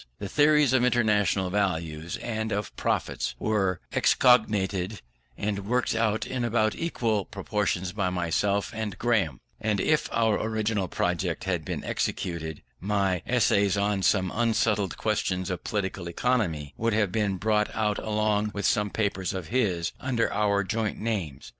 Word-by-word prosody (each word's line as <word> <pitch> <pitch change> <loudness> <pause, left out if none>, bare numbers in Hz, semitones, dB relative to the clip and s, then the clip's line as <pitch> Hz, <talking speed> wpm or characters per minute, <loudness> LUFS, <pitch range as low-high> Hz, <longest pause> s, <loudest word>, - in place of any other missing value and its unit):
The 100 - -5
theories 150 +1 +4
of 125 -2 +4
International 105 -6 +2
Values 85 -5 -1
and 110 -1 -2
of 105 -1 -3
Profits - - -1
were 95 -4 0
excogitated 105 -5 +3 0.4
and 100 -1 -3
worked 125 +2 +1
out 110 -1 +1
in 130 -2 -3
about 110 -2 +2
equal 115 - -1
proportions 95 -3 -2
by 95 -2 -1
myself 90 +3 0
and 110 -3 -4
Graham: 105 - +1 0.2
and 110 -2 0
if 155 +8 +1
our 115 -2 +2
original 110 -3 -1
project 90 0 -1
had 90 -4 -1
been - - -4
executed, 80 -3 -3 0.2
my 95 -2 0
Essays 100 -5 +3
on 100 -1 +1
Some 95 -1 +2
Unsettled 110 -4 +1
Questions 95 -4 -1
of 90 - -4
Political 95 -3 -3
Economy 85 - 0
would 115 0 0
have 105 -3 +1
been 100 -2 0
brought 105 +2 +1
out 105 -2 0
along 105 -1 0
with 100 - -2
some 105 -1 +2
papers 100 -3 -1
of 90 -4 -5
his, 95 -9 0
under 125 -3 0
our 100 -1 +2
joint 110 +1 -2
names. 95 - -3
105 Hz, 145 wpm, -27 LUFS, 95-110 Hz, 0.4 s, theories